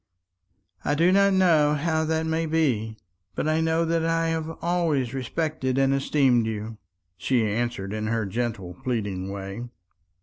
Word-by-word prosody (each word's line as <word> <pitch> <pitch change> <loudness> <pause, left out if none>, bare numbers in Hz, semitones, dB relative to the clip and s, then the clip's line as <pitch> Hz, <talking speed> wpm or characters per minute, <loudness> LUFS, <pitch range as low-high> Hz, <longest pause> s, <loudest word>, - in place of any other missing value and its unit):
"I 145 - +1
do 170 +4 +4
not 200 +1 +4
know 160 -6 +4
how 160 +1 0
that 160 0 0
may 160 0 -1
be; 125 -9 0 0.4
but - - -1
I 155 +1 +2
know 160 +1 +1
that 165 0 0
I 165 0 +1
have 160 -1 -2
always 165 -8 0
respected 135 0 -2
and 135 0 +3
esteemed 135 -4 +2
you," 110 0 -5 0.4
she 115 +6 +1
answered 105 -2 -2
in 110 0 -3
her 115 -1 0
gentle 105 -4 -3
pleading 100 -7 -2
way. 100 +4 -6
135 Hz, 155 wpm, -25 LUFS, 110-160 Hz, 0.4 s, do